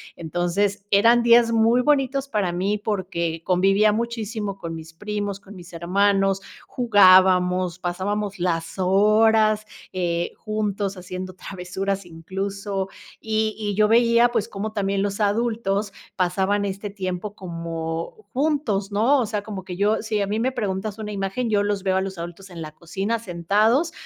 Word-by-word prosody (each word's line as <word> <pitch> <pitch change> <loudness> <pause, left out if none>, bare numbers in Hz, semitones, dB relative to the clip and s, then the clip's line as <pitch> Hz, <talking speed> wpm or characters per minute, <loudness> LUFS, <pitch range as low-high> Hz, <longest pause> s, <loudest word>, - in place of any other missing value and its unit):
Entonces, 175 +4 -1
eran 230 +4 +5
días 235 0 +5
muy 230 +2 +4
bonitos 275 -1 +1
para 205 -8 0
mí, 195 +4 0
porque 175 -6 -2
convivía 195 +3 +3
muchísimo 220 -2 -3
con 165 -3 -6
mis 160 0 -9
primos, 205 +1 -4
con 200 +1 -14
mis 175 0 -12
hermanos, 195 +3 +1 0.3
jugábamos, 185 -5 +4
pasábamos 195 +2 -3
las 165 -2 -1
horas, 215 +3 +4 0.3
eh, 175 -2 -1
juntos 205 -2 -2
haciendo 185 0 -6
travesuras 190 +1 -4
incluso, 195 +3 -4 0.3
y 220 -1 0
y 205 -2 -2
yo 210 +1 +4
veía 235 +1 +5
pues 225 -4 -1
como 215 +2 -5
también 195 -1 0
los 200 0 -2
adultos 210 -1 0 0.2
pasaban 190 +2 +1
este 200 +1 -4
tiempo 190 +1 -5
como 165 - -5
juntos, 260 -9 0
¿no?, 230 +8 +3
o 245 - +1
sea, 210 -1 -3
como 200 -3 -6
que 180 -1 -7
yo 210 +2 +2
si 215 -2 -1
a 200 - 0
mí 215 +2 -1
me 260 +3 +1
preguntas 205 -2 -3
una 210 -1 -5
imagen 200 +4 -2
yo 205 -1 +3
los 205 -1 -1
veo 190 -1 +1
a 190 - +1
los 190 -1 -5
adultos 175 +3 -8
en 170 -2 -9
la 155 - -8
cocina 195 +8 -3
sentados 215 - +1
200 Hz, 155 wpm, -23 LUFS, 185-215 Hz, 0.3 s, eran